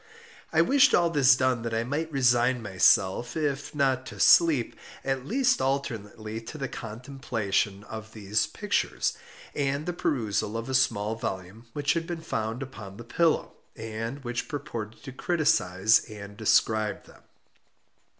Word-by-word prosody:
I - - +4
wished 280 0 +5
all 170 -1 +3
this 135 -5 +5
done 130 -2 +1
that 115 -1 -3
I 115 - 0
might 150 +6 -3
resign 125 -2 +2
myself, 95 - +2
if 145 -1 -2
not 135 -2 +1
to - - -9
sleep, 155 -9 +5 0.3
at 135 0 -2
least 260 +2 +2
alternately 115 -5 -3
to 115 - -9
the 135 -2 -3
contemplation 110 -5 -3
of 110 +1 -9
these 105 0 0
pictures, - - -1 0.4
and 140 +1 -1
the 175 - -2
perusal 110 -8 -1
of 115 - -5
a - - -2
small 110 -4 +2
volume 100 +1 -6
which 145 -1 +1
had 165 -1 -2
been 170 -2 -4
found 115 -4 -3
upon 100 -7 -10
the 120 - -8
pillow, 160 +8 +1 0.2
and 115 +4 -5
which 120 0 -3
purported 115 -7 -6
to 135 - -7
criticise 110 - +2
and 100 -1 -9
describe 110 0 +1
them. - - -18
120 Hz, 150 wpm, -27 LUFS, 110-140 Hz, 0.4 s, wished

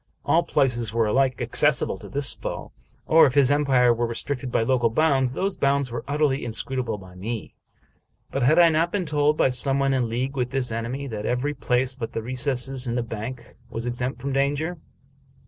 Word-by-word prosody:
All - - +4
places 120 -5 0
were 115 0 +1
alike 130 +4 +1
accessible - - +1
to - - -11
this 140 -1 -2
foe; - - -6 0.3
or, 160 -1 +6
if 130 - -3
his 140 -1 +5
empire 135 -4 +4
were 120 0 -1
restricted 125 +2 -4
by 115 - +2
local 120 -1 +2
bounds, 135 -1 +2
those 195 +5 -1
bounds 140 -2 +1
were 115 -1 -4
utterly 145 -1 +1
inscrutable 120 0 -2
by 95 -2 -13
me. 105 +4 -6 0.8
But 135 - -2
had 145 +7 +4
I 170 -1 +7
not 165 +2 +1
been 195 -2 -1
told, 150 0 +1
by - - +3
some 135 +2 +1
one 135 0 +2
in 125 -3 0
league 130 +4 -2
with 125 -2 -1
this 130 -2 -1
enemy, 115 +5 -3
that 105 -2 -4
every 125 +4 0
place 125 0 0
but 115 -4 -6
the 115 - -3
recess 130 +1 -1
in 120 - -1
the 120 - 0
bank 115 +2 -7
was 115 +1 -5
exempt 125 +1 -3
from 140 +1 -3
danger 145 +5 0
130 Hz, 200 wpm, -24 LUFS, 120-140 Hz, 0.8 s, I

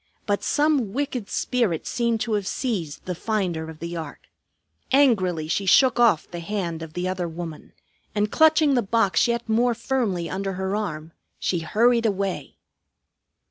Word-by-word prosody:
But 205 -1 0
some 290 -9 +1
wicked 265 -6 -3
spirit 230 -11 0
seemed 235 -2 0
to 225 -1 -1
have 205 -2 -1
seized 195 - -3
the 185 - -2
finder 175 -5 -2
of 160 - -9
the 170 +2 -6
ark. 160 -3 -6 0.7
Angrily 190 - +3
she 195 +4 -1
shook 250 +4 +5
off 230 -10 +4
the 175 - -5
hand 170 -3 -3
of 160 -1 -8
the 180 +2 -2
other 185 -1 -2
woman, 165 -1 -8 0.4
and 210 +1 0
clutching 315 -2 +4
the 245 - +3
box 225 0 +2
yet 235 0 -1
more 235 +2 +2
firmly 225 -8 -1
under 195 +2 -3
her 190 +2 -2
arm, 160 -7 -4 0.3
she 175 - -1
hurried 230 +7 +2
away. 195 -2 -3
200 Hz, 160 wpm, -24 LUFS, 175-235 Hz, 0.7 s, shook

